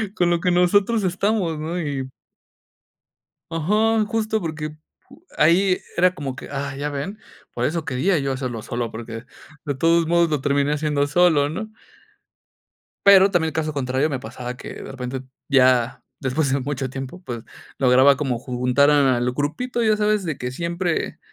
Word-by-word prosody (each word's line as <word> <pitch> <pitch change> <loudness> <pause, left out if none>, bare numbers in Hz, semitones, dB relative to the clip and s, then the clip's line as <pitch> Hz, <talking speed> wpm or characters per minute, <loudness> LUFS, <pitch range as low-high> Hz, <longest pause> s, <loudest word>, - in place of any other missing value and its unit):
con 175 -3 +2
lo 170 -1 +2
que 180 0 +1
nosotros 200 +5 +3
estamos," 185 -2 0
¿no? 165 +3 -3
Y. 135 -3 -3 1.4
Ajá, 215 +7 +2
justo 220 0 -1
porque 155 -2 -5 0.6
ahí 185 +3 +4 0.2
era 180 +1 +4
como 140 -6 -5
que, - - -10
ah, 140 -1 -4
¿ya 145 +2 -3
ven? 145 +9 -5 0.4
Por 120 - -3
eso 160 +4 -1
quería 155 +8 +1
yo 135 -1 -1
hacerlo 125 -4 -4
solo, 120 0 -4
porque 115 +1 -7 0.4
de 145 -3 -3
todos 165 +4 +3
modos 170 0 +3
lo 150 -3 -1
terminé 140 +1 +1
haciendo 150 -1 0
solo, 155 -2 +3
¿no? 215 +7 -5 1.3
Pero 195 0 +7
también 160 -2 +2
el - - -11
caso 155 -1 -2
contrario 135 +2 0
me 135 - -3
pasaba 125 +2 -7
que - - -8
de - - -9
repente 130 0 -5 0.3
ya 125 -3 +3 0.2
después 135 +1 0
de 140 - +1
mucho 135 -1 -3
tiempo, 135 +7 -7
pues, 120 -7 -6 0.3
lograba 130 +2 +5
como 130 -6 -1
ju 125 0 -6
juntar 125 +4 +3
al 130 -4 +3
grupito, 235 - -2
ya 215 -1 +3
sabes, 210 -1 +1
de 155 -5 -3
que 125 0 -4
siempre. 170 +4 -2
150 Hz, 165 wpm, -22 LUFS, 130-175 Hz, 1.4 s, Pero